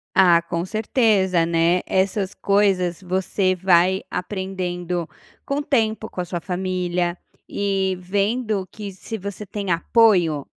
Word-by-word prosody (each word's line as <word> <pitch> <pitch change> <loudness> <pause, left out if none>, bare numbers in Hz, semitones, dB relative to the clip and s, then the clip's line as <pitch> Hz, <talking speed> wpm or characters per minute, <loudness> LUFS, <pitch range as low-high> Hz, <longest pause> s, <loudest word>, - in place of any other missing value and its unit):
Ah, 175 -3 +6
com 170 0 -3
certeza, 205 -4 +2
né, 170 +2 +2
essas 190 +1 0
coisas 195 -4 +1
você 185 +1 0
vai 185 +1 +3
aprendendo 180 -3 -3 0.4
com 275 - -2
o 290 - 0
tempo, 220 -6 0
com 180 - -4
a - - -4
sua 175 0 -4
família 180 -1 -2 0.3
e 195 -2 -1
vendo 205 +2 -1
que 210 -2 -7
se 210 +4 -7
você 200 +1 -7
tem 200 -1 -5
apoio, 170 - +3
190 Hz, 130 wpm, -22 LUFS, 175-205 Hz, 0.4 s, Ah